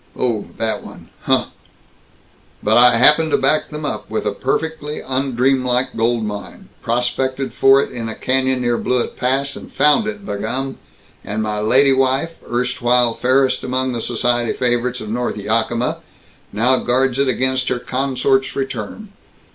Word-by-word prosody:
"Oh! 115 -5 -1
That 110 -1 -1
one. - - -13 0.2
Huh!" - - +1 1.1
"But - - +3
I 120 -1 +6
happen 150 +6 +6
to - - +3
back 145 +3 +2
them 150 0 -6
up 105 -7 -4
with 110 - -3
a - - +1
perfectly 150 +2 -3
undreamlike 130 -1 0
gold 115 0 0
mine. 105 -1 -7
Prospected 130 +3 -1
for 135 +1 +5
it - - -7
in 115 -3 -5
a 110 - -6
canyon 130 0 0
near 120 -1 0
Blewett 125 -1 -1
Pass 135 +2 -1
and - - -11
found 150 +9 +3
it, 210 -2 -5
b' 100 - -4
gum, 135 +5 -3 0.4
and 110 +2 -3
my 105 -1 -2
lady 135 +6 +4
wife, 135 +5 0
erstwhile 125 -1 +1
fairest 130 +1 +1
among 130 0 -1
the 120 -2 -3
society 120 0 0
favorites 125 0 -1
of 110 - -7
North 120 +1 -2
Yakima, 115 +3 -1 0.5
now 125 +5 +2
guards 125 +1 +1
it 140 - +2
against 130 +1 0
her - - 0
consort's 135 +1 0
return. 135 - -5
125 Hz, 155 wpm, -19 LUFS, 120-135 Hz, 1.1 s, I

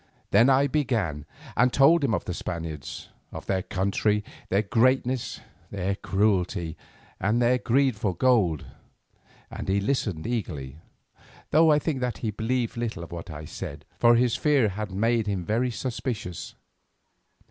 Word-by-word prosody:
Then 115 +6 +6
I 135 +1 +5
began 115 - -1 0.3
and 125 0 +4
told 145 +5 +5
him 115 -6 +2
of - - -4
the 90 - -3
Spaniards—of 80 -1 -7
their 95 -1 0
country, 100 +3 0 0.3
their 100 +3 +2
greatness, 125 +3 +1 0.3
their 100 0 -2
cruelty 95 -5 0 0.4
and 105 +5 +1
their 125 +1 +3
greed 130 -3 +1
of 95 -5 0
gold, 105 - +2 0.9
and - - -6
he 100 +1 +2
listened 100 - -1
eagerly, 80 - -4 0.7
though 160 +1 +6
I 150 - +5
think 150 -2 -1
that 125 -1 -2
he 110 - -2
believed 115 +3 -1
little 110 -7 -3
of 85 - -10
what 85 +1 -7
I 75 -1 -7
said, 70 0 -7
for 120 0 +6
his 120 0 +2
fear 135 -4 +3
had 105 +2 -4
made 115 +3 +1
him 95 -4 -2
very 120 +6 +1
suspicious. 115 -6 -4
110 Hz, 145 wpm, -26 LUFS, 90-125 Hz, 0.9 s, Then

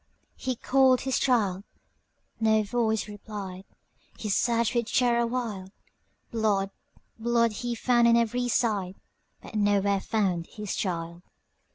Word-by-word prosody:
He 255 -1 -3
called 260 +1 +3
his 265 0 0
child,—no 220 0 -1
voice 220 0 0
replied,—He 205 0 -9
searched 235 +3 +1
with 235 -2 -1
terror 235 -2 +3
wild; 225 -6 -4 0.6
Blood, 205 -4 +1 0.5
blood, 235 0 +2
he 235 +3 -3
found 240 0 +3
on 235 0 +5
every 245 +2 0
side, 205 -6 0 0.5
But - - -11
nowhere 205 -1 +2
found 185 -7 -1
his 210 -2 -5
child. 170 -2 -3
220 Hz, 110 wpm, -27 LUFS, 200-235 Hz, 0.6 s, on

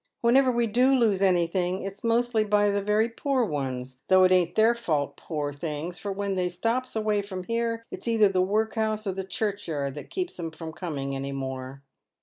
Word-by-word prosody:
Whenever 255 +2 +5
we 240 -1 +1
do 250 +5 +3
lose 215 -6 +2
anything 180 0 +1
it's 195 +1 -7
mostly 230 -1 +2
by 205 -1 +3
the 200 0 0
very 210 +2 +2
poor 255 +2 0
ones; 130 -6 -4
though 185 0 +6
it 185 - +5
ain't 180 -2 +3
their 220 +2 +5
fault, 155 -12 -1
poor 145 -3 -4
things, 155 +3 -5
for 200 +4 -4
when 200 0 -2
they 180 -1 0
stops 230 +8 -2
away 215 -1 +1
from 190 -2 -6
here 230 +2 -2
it's - - -7
either 225 -3 +5
the 190 -2 +1
workhouse 215 +2 0
or 195 - 0
the 190 +1 -4
churchyard 180 -8 -2
that 150 - -9
keeps 370 -2 -4
them 165 -2 -4
from 160 0 -8
coming 140 -6 -4
any 135 +1 -4
more." 135 0 -5
195 Hz, 195 wpm, -26 LUFS, 160-225 Hz, -, though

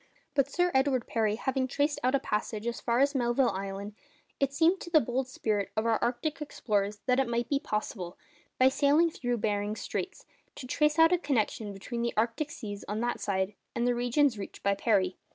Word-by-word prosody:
But 275 -1 +2
Sir 355 +4 +1
Edward 265 -2 +2
Parry 215 -2 0
having 260 +2 -1
traced 285 +3 0
out 255 +2 +3
a - - +3
passage 215 -2 -3
as 235 0 -3
far 235 +2 +1
as 280 +1 +3
Melville 245 -1 +2
Island, 195 +2 -5 0.5
it 275 -1 +1
seemed 330 +6 +3
to - - -7
the 325 -2 +6
bold 250 +1 -1
spirit 215 -6 -1
of 220 - +1
our 225 -1 +2
arctic 285 +6 -1
explorers 205 -7 -1
that 255 0 +3
it 270 - +2
might 235 0 -1
be 280 - +2
possible, 210 - -4 0.4
by 255 - +6
sailing 290 +5 +3
through 245 -4 -2
Behring's 205 0 -1
Straits, - - -4 0.3
to 260 - -8
trace 300 +4 +1
out 325 +2 +6
a 355 - +3
connection 235 - -1
between 220 +5 -5
the 235 0 -1
arctic 230 +7 0
seas 205 -7 -7
on 210 +1 -2
that 240 0 -1
side 190 0 -1 0.2
and 235 - 0
the 245 - +3
regions 245 0 +2
reached 195 - -8
by 200 - +3
Parry. 195 -3 +1
240 Hz, 205 wpm, -29 LUFS, 210-280 Hz, 0.5 s, the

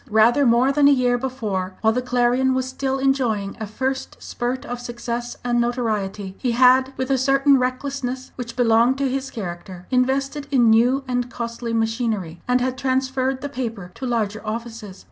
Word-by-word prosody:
Rather 235 +5 +4
more 240 +3 +4
than 285 0 +4
a - - +7
year 250 -3 +3
before, 215 -8 -3
while 220 0 +3
the 250 - 0
Clarion 250 +1 +2
was 260 0 -1
still 265 +1 -2
enjoying 245 -7 0
a 220 - -4
first 265 +5 -3
spurt 245 +2 -4
of 245 0 -5
success 240 0 -5
and 240 -1 +1
notoriety, 215 -5 -2
he 245 -2 0
had, 260 +2 +5
with 260 +1 -2
a 265 - +2
certain 275 +1 +4
recklessness 255 0 -3
which 235 -2 -7
belonged 240 +1 +3
to 275 0 0
his 265 +1 -2
character, 180 -3 -7
invested 270 +3 0
in 245 -5 +4
new 245 +5 +3
and 245 -1 -1
costly 235 0 -5
machinery, 225 -6 -1
and 250 0 +2
had 255 0 -2
transferred 260 0 0
the 285 - -3
paper 230 -9 -5
to 260 - -6
larger 220 -3 -1
offices. 225 -3 -6
245 Hz, 175 wpm, -22 LUFS, 225-260 Hz, -, a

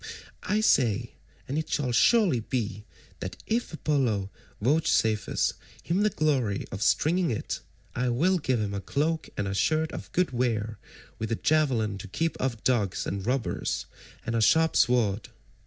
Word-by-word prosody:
I 210 +1 0
say—and 125 - 0
it 160 - -5
shall 130 -4 0
surely 180 - +4
be—that 105 -5 -6
if 235 +2 -1
Apollo 125 - 0 0.3
vouchsafes 110 -4 +2 0.3
him 175 +4 0
the 210 - +4
glory 135 - 0
of 95 - -5
stringing 170 +8 +2
it, 115 - -3 0.3
I 125 0 0
will 175 +10 +2
give 130 -5 0
him 105 -2 -2
a 100 - -3
cloak 155 - -1
and 100 -1 -2
shirt 155 +8 +1
of - - -8
good 180 -4 +1
wear, 110 -4 -1 0.4
with 110 +1 -3
a - - +2
javelin 120 -10 +1
to 100 - -8
keep 165 - -1
off 120 -4 -2
dogs 110 -8 +1
and 100 0 -3
robbers, 125 +1 -1 0.4
and 115 - -2
a 115 - +2
sharp 160 +8 +4
sword. 110 -4 +2
125 Hz, 150 wpm, -27 LUFS, 110-155 Hz, 0.4 s, surely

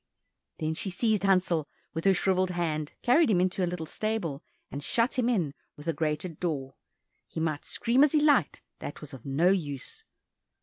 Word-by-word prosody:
Then 155 0 -1
she 195 - -3
seized 215 +3 +1
Hansel 180 -5 +2 0.2
with 165 +3 -4
her 195 - +6
shrivelled 185 0 +2
hand, 160 -4 -2
carried 275 +4 +5
him 190 -5 +4
into 185 +1 +1
a 175 - +1
little 175 -2 -4
stable, 175 -6 -2 0.3
and 140 +1 -5
shut 235 - +1
him 245 -1 +2
in 175 - +1 0.2
with 145 +2 -11
a 165 - +2
grated 155 +1 -2
door. 140 -6 -2 0.5
He - - -6
might 155 -2 -1
scream 245 +4 +3
as 295 - +4
he 305 - +5
liked, 290 - +3 0.2
that 145 - -7
was 150 -1 -8
of 130 0 -10
no 150 +7 +3
use. 165 - -2
175 Hz, 185 wpm, -28 LUFS, 155-210 Hz, 0.5 s, her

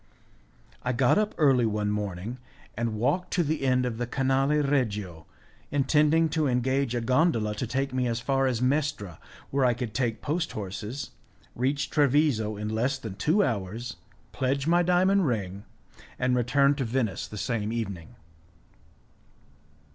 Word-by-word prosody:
I 125 - -1
got 125 - +3
up 215 0 -1
early 135 -6 +4
one 105 -1 -1
morning, 105 +3 -4 0.4
and 115 -1 -2
walked 145 - 0
to 175 - +2
the 155 0 -1
end 130 -1 +2
of 120 -2 -3
the 120 - -2
canale 135 +3 +1
regio, 105 - -1 0.4
intending 150 +3 +3
to 155 -2 0
engage 130 0 0
a 120 - 0
gondola 125 -3 +2
to 110 +4 -4
take 135 +3 -2
me 130 -1 0
as 115 -1 -1
far 135 +2 +1
as 125 -1 -1
Mestra, 130 - -1 0.3
where 140 0 +1
I 125 -2 +3
could 120 -3 -5
take 115 -4 -1
post 160 +2 -1
horses, 105 +6 -5 0.4
reach 140 +4 -1
Treviso 140 -7 +2
in 105 +1 -4
less 120 +5 0
than 110 -6 -7
two 160 - +2
hours, 110 - -3 0.3
pledge 135 +1 -1
my 175 +2 +4
diamond 180 +1 +3
ring, 100 -4 -3 0.5
and 125 0 +1
return 140 +4 +3
to 135 - 0
Venice 115 -4 -1
the 105 - -9
same 110 -1 -2
evening. 100 -8 -5
125 Hz, 155 wpm, -27 LUFS, 110-140 Hz, 0.5 s, early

